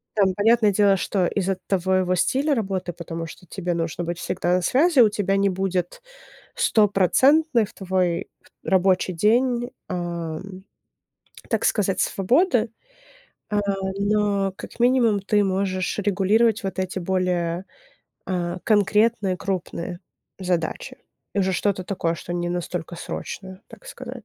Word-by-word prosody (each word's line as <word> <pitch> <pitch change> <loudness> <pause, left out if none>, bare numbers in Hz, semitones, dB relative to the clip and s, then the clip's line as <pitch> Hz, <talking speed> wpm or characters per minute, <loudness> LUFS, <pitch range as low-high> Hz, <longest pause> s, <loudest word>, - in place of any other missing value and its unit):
Там, 195 -3 +3
понятное 215 0 +4
дело, 200 0 +4
что 185 0 0
из-за 195 0 -1
твоего 185 -1 +1
стиля 275 - +1
работы, 190 -6 -2
потому 165 -1 -6
что 180 +2 -12
тебе 175 -1 -3
нужно 165 +1 -2
быть 170 0 -4
всегда 175 0 -1
на 180 - -1
связи, 290 - +3
у 225 - +8
тебя 195 -1 0
не 200 0 +3
будет 185 -2 -2 0.5
стопроцентной 230 - +3
в 205 - -16
твой 185 -3 -1 0.4
рабочий 185 0 +2
день, 240 +6 +2 0.2
ам, 175 +1 -5 0.9
так - - 0
сказать, 195 -3 +1
свободы. 245 - +2 0.8
Э, 210 - +1 0.4
но 200 -1 +1
как - - -11
минимум 240 -4 +3
ты 205 +1 +2
можешь 190 -1 -1
регулировать 205 +3 +2
вот 190 -2 -3
эти 185 0 -2
более, 180 -1 -1 0.6
э, 180 -1 -2
конкретные 210 -2 +2
крупные 180 -2 -4 0.4
задачи. 180 -3 -2 0.4
Уже 190 -1 +1
что-то 190 0 0
такое, 170 -3 -1
что 170 +1 -7
не 175 0 -2
настолько 175 -1 -4
срочное, 190 +2 -7
так - - -15
сказать. - - -9
190 Hz, 130 wpm, -23 LUFS, 180-210 Hz, 0.9 s, у